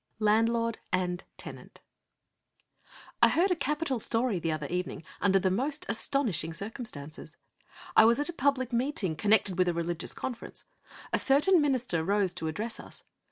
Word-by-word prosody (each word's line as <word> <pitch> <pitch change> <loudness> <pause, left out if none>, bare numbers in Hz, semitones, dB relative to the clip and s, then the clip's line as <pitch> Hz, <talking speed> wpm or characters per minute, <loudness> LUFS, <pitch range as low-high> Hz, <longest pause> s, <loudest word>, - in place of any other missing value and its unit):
V 215 - -2
LANDLORD 230 +1 +2
AND 180 -1 -1
TENANT - - -10 1.4
I - - +7
heard 365 +4 +2
a - - +3
capital 300 -4 -1
story 225 -3 +1
the 165 -1 -1
other 155 -2 -3
evening 180 +1 -3 0.2
under 195 -1 +4
the 190 -1 +1
most 265 +9 -1
astonishing 220 - 0
circumstances. 165 - -7 0.6
It 220 - +8
was 235 +4 +4
at 290 - 0
a 345 - -3
public 260 -4 0
meeting 235 - 0
connected 200 0 +2
with 180 - +4
a 175 - 0
religious 170 0 -3
conference. 245 -3 -6 0.5
A - - +3
certain 300 +6 +4
minister 250 - 0
rose 195 0 +1
to 170 -3 -4
address 215 +8 -3
us. - - -10
220 Hz, 160 wpm, -29 LUFS, 180-260 Hz, 1.4 s, It